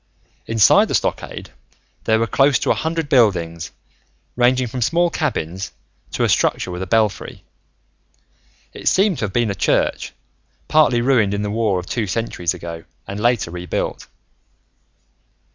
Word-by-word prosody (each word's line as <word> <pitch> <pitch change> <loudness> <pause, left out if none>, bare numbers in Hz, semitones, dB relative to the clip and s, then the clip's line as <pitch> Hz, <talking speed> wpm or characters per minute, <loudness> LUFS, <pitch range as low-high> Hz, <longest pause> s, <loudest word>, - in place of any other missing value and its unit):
Inside 115 -3 +5
the - - -1
stockade, - - -3 0.5
there 110 - +3
were 115 - +1
close 135 +4 +3
to - - 0
a - - +5
hundred 160 -1 -2
buildings, 85 - +1 0.7
ranging 125 +1 +3
from 125 +2 -5
small 170 +7 +2
cabins 95 - -3 0.4
to - - 0
a - - +3
structure 90 - +1
with 90 +1 -5
a 95 - -4
belfry. 110 +1 0 1.3
It - - -7
seemed 195 -3 +3
to - - 0
have 95 - -6
been 120 -3 +1
a - - -1
church, 95 - 0 0.5
partly 150 -6 +3
ruined 115 -6 +2
in 100 - -2
the 105 - -3
war 110 -3 0
of 90 - -8
two 115 -1 -2
centuries 90 -4 -2
ago 85 -2 -8 0.2
and 100 +1 -5
later 120 -6 +1
rebuilt. 90 0 -4
110 Hz, 150 wpm, -20 LUFS, 95-130 Hz, 1.3 s, Inside